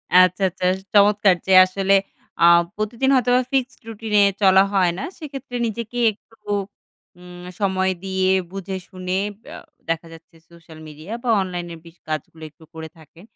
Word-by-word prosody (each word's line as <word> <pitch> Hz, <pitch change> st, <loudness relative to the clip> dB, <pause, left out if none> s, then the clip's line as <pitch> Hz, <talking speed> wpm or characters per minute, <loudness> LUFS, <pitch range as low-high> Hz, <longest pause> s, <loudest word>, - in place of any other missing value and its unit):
আচ্ছা, 185 Hz, +1 st, +5 dB
আচ্ছা। 185 Hz, +1 st, -11 dB
এস 190 Hz, -, -6 dB
চমৎকার 205 Hz, -2 st, +4 dB
যে 190 Hz, -, +3 dB
আসলে 195 Hz, +1 st, 0 dB, 0.5 s
আ 170 Hz, -, +6 dB, 0.3 s
প্রতিদিন 230 Hz, +5 st, -1 dB
হয়তোবা 250 Hz, 0 st, +3 dB
ফিক্সড 260 Hz, -1 st, -1 dB
রুটিন 220 Hz, -1 st, -7 dB
এ -, -, +6 dB, 0.2 s
চলা 190 Hz, -1 st, +6 dB
হয় 185 Hz, -3 st, +3 dB
না। -, -, -5 dB
সেক্ষেত্রে 275 Hz, -6 st, -8 dB
নিজেকে 230 Hz, +2 st, -6 dB
একটু 225 Hz, +2 st, -23 dB, 0.8 s
উম 180 Hz, 0 st, -12 dB, 0.2 s
সময় 190 Hz, -1 st, 0 dB
দিয়ে 190 Hz, -1 st, 0 dB, 0.2 s
বুঝে-শুনে 185 Hz, -1 st, -5 dB, 0.3 s
অ্যা -, -, -9 dB, 0.3 s
দেখা 165 Hz, 0 st, -2 dB
যাচ্ছে 165 Hz, +1 st, -17 dB
সোশ্যাল 165 Hz, -2 st, -16 dB
মিডিয়া 155 Hz, +7 st, -10 dB
বা 245 Hz, -, -2 dB
অনলাইনের 175 Hz, -3 st, -6 dB
বিশ 165 Hz, +1 st, -16 dB
কাজগুলো 155 Hz, +1 st, -6 dB
একটু 155 Hz, +2 st, -22 dB
করে 160 Hz, 0 st, -8 dB
থাকে। 160 Hz, +2 st, -18 dB
190 Hz, 155 wpm, -21 LUFS, 175-210 Hz, 0.8 s, আ